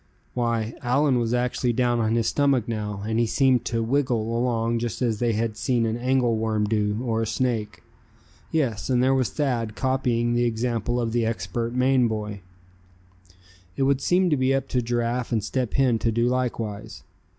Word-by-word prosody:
Why, 115 Hz, -2 st, -1 dB
Allan 135 Hz, +1 st, +2 dB
was 115 Hz, -1 st, -1 dB
actually 125 Hz, 0 st, 0 dB
down 120 Hz, 0 st, +1 dB
on 110 Hz, 0 st, +1 dB
his 115 Hz, -1 st, +1 dB
stomach 140 Hz, -5 st, +2 dB
now, 105 Hz, -3 st, -4 dB
and 110 Hz, +1 st, 0 dB
he 120 Hz, -, +2 dB
seemed 130 Hz, 0 st, +2 dB
to 115 Hz, -1 st, -1 dB
"wiggle" 115 Hz, -3 st, 0 dB
along 115 Hz, -1 st, 0 dB
just 120 Hz, -2 st, -3 dB
as 115 Hz, -4 st, 0 dB
they 120 Hz, -1 st, +1 dB
had 110 Hz, 0 st, -1 dB
seen 120 Hz, +1 st, 0 dB
an 110 Hz, 0 st, -1 dB
angle 125 Hz, -1 st, +1 dB
worm 110 Hz, -1 st, 0 dB
do, 105 Hz, +1 st, 0 dB
or 115 Hz, -2 st, 0 dB
a 115 Hz, -, -1 dB
snake. 110 Hz, -2 st, -2 dB, 0.7 s
Yes, 130 Hz, -11 st, -1 dB
and 125 Hz, -1 st, +2 dB
there 130 Hz, +1 st, +3 dB
was 130 Hz, -3 st, +1 dB
Thad 120 Hz, -7 st, -2 dB
copying 125 Hz, -3 st, 0 dB
the 120 Hz, 0 st, +2 dB
example 120 Hz, 0 st, -1 dB
of 115 Hz, -2 st, -1 dB
the 120 Hz, 0 st, +1 dB
expert 115 Hz, +2 st, -2 dB
Maine 130 Hz, -1 st, +3 dB
boy. 105 Hz, -2 st, -4 dB, 1.4 s
It 135 Hz, -, +1 dB
would 135 Hz, 0 st, +2 dB
seem 180 Hz, +3 st, +2 dB
to 150 Hz, -, +3 dB
be 130 Hz, +1 st, +2 dB
up 135 Hz, -1 st, -2 dB
to 125 Hz, -, +1 dB
Giraffe 120 Hz, +1 st, -1 dB
and 110 Hz, -3 st, 0 dB
Step 125 Hz, +2 st, -2 dB
Hen 130 Hz, -4 st, +3 dB
to 115 Hz, -, +1 dB
do 115 Hz, +2 st, +1 dB
likewise. 115 Hz, -5 st, -3 dB
120 Hz, 185 wpm, -24 LUFS, 110-125 Hz, 1.4 s, there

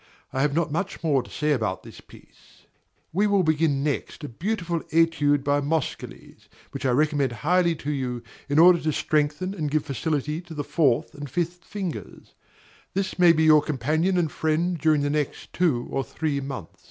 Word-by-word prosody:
I 130 Hz, -, 0 dB
have 145 Hz, 0 st, +1 dB
not 165 Hz, -2 st, 0 dB
much 175 Hz, +3 st, -3 dB
more 145 Hz, -5 st, +2 dB
to -, -, -14 dB
say 150 Hz, 0 st, -1 dB
about 110 Hz, -9 st, -1 dB
this -, -, -12 dB
piece. -, -, -20 dB, 0.5 s
We 200 Hz, +5 st, +2 dB
will 200 Hz, -2 st, +3 dB
begin 155 Hz, -3 st, +1 dB
next 150 Hz, +2 st, -3 dB
a -, -, -4 dB
beautiful 175 Hz, -, -2 dB
Etude 155 Hz, -3 st, +2 dB
by 145 Hz, 0 st, +1 dB
Moscheles, 150 Hz, 0 st, -4 dB, 0.2 s
which -, -, -3 dB
I -, -, +2 dB
recommend 145 Hz, 0 st, +2 dB
highly 170 Hz, +6 st, +1 dB
to 150 Hz, -1 st, -4 dB
you, 125 Hz, -4 st, -3 dB, 0.3 s
in 145 Hz, -, +1 dB
order 175 Hz, +1 st, +7 dB
to 155 Hz, -, -1 dB
strengthen 150 Hz, +6 st, 0 dB
and 155 Hz, -7 st, -3 dB
give 155 Hz, 0 st, 0 dB
facility 150 Hz, +1 st, -2 dB
to 175 Hz, -2 st, -11 dB
the 145 Hz, -, -2 dB
fourth 130 Hz, -7 st, +1 dB
and 145 Hz, -1 st, -8 dB
fifth 175 Hz, +4 st, -3 dB
fingers: 190 Hz, -5 st, -7 dB, 0.6 s
this 190 Hz, -1 st, -2 dB
may 175 Hz, -1 st, +7 dB
be 160 Hz, -1 st, +2 dB
your 155 Hz, -1 st, +6 dB
companion 155 Hz, +6 st, 0 dB
and 165 Hz, -4 st, +1 dB
friend 160 Hz, +3 st, 0 dB
during 155 Hz, 0 st, +3 dB
the 145 Hz, 0 st, 0 dB
next 150 Hz, -2 st, -3 dB
two 150 Hz, -10 st, +1 dB
or 135 Hz, -, -1 dB
three 150 Hz, 0 st, -2 dB
months. 135 Hz, -, -7 dB
155 Hz, 185 wpm, -25 LUFS, 145-170 Hz, 0.6 s, order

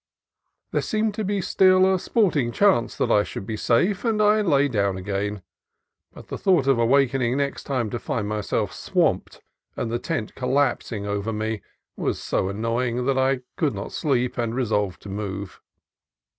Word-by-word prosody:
There -, -, +1 dB
seemed 215 Hz, 0 st, 0 dB
to 215 Hz, -, -3 dB
be 200 Hz, 0 st, -1 dB
still 185 Hz, 0 st, +4 dB
a 185 Hz, -, +1 dB
"sport 205 Hz, -2 st, +1 dB
ing 120 Hz, -5 st, +1 dB
chance" 190 Hz, -, +2 dB
that -, -, +1 dB
I 105 Hz, -, +5 dB
should 100 Hz, -, -6 dB
be 110 Hz, -, -4 dB
safe, 180 Hz, -, +1 dB
and 225 Hz, -3 st, +1 dB
I 215 Hz, 0 st, +4 dB
lay 145 Hz, -7 st, +3 dB
down 100 Hz, -6 st, 0 dB
again; 100 Hz, +1 st, -3 dB, 0.7 s
but -, -, -14 dB
the -, -, -5 dB
thought 180 Hz, -8 st, +3 dB
of 135 Hz, -3 st, +3 dB
awaking 130 Hz, 0 st, +2 dB
next 140 Hz, -1 st, -2 dB
time 125 Hz, -6 st, -1 dB
to 120 Hz, -, -3 dB
find 115 Hz, -9 st, -3 dB
myself 105 Hz, -1 st, -2 dB
swamped -, -, 0 dB, 0.4 s
and 115 Hz, -, -2 dB
the 120 Hz, -, -1 dB
tent 155 Hz, -9 st, -3 dB
collapsing 125 Hz, -5 st, 0 dB
over 100 Hz, +2 st, -2 dB
me 110 Hz, 0 st, -3 dB, 0.3 s
was -, -, -2 dB
so 95 Hz, -, -1 dB
annoying 115 Hz, +4 st, -1 dB
that 135 Hz, 0 st, +1 dB
I 130 Hz, 0 st, +2 dB, 0.2 s
could 150 Hz, -9 st, 0 dB
not 100 Hz, -, -6 dB
sleep 125 Hz, -4 st, 0 dB
and 115 Hz, -1 st, -1 dB
re 130 Hz, -1 st, 0 dB
solved 105 Hz, -4 st, -1 dB
to 100 Hz, -, -8 dB
move. 100 Hz, -1 st, -5 dB
125 Hz, 180 wpm, -24 LUFS, 105-150 Hz, 0.7 s, I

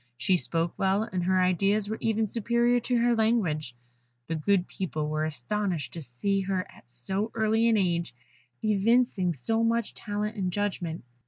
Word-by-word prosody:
She 185 Hz, -, +2 dB
spoke 165 Hz, -1 st, 0 dB
well, 195 Hz, +2 st, +2 dB
and 185 Hz, -5 st, -3 dB
her 185 Hz, 0 st, +3 dB
ideas 195 Hz, +3 st, +2 dB
were 220 Hz, +1 st, -4 dB
even 220 Hz, 0 st, +1 dB
superior 235 Hz, +3 st, +2 dB
to 245 Hz, +1 st, 0 dB
her 235 Hz, 0 st, +3 dB
language. 185 Hz, -, +1 dB, 0.5 s
The 165 Hz, -, -3 dB
good 180 Hz, +4 st, +1 dB
people 155 Hz, -5 st, -3 dB
were 155 Hz, 0 st, -1 dB
astonished 160 Hz, +2 st, -2 dB
to 165 Hz, -, -6 dB
see 195 Hz, +10 st, -1 dB
her 190 Hz, -1 st, -1 dB
at 120 Hz, -, -19 dB
so 190 Hz, -, -3 dB
early 220 Hz, +1 st, +3 dB
an 225 Hz, -, +4 dB
age 170 Hz, -7 st, 0 dB, 0.5 s
evincing 215 Hz, -2 st, +2 dB
so 225 Hz, -, -1 dB
much 230 Hz, -1 st, 0 dB
talent 210 Hz, 0 st, -3 dB
and 185 Hz, -2 st, -1 dB
judgment. 175 Hz, -5 st, -2 dB
195 Hz, 165 wpm, -28 LUFS, 170-220 Hz, 0.5 s, an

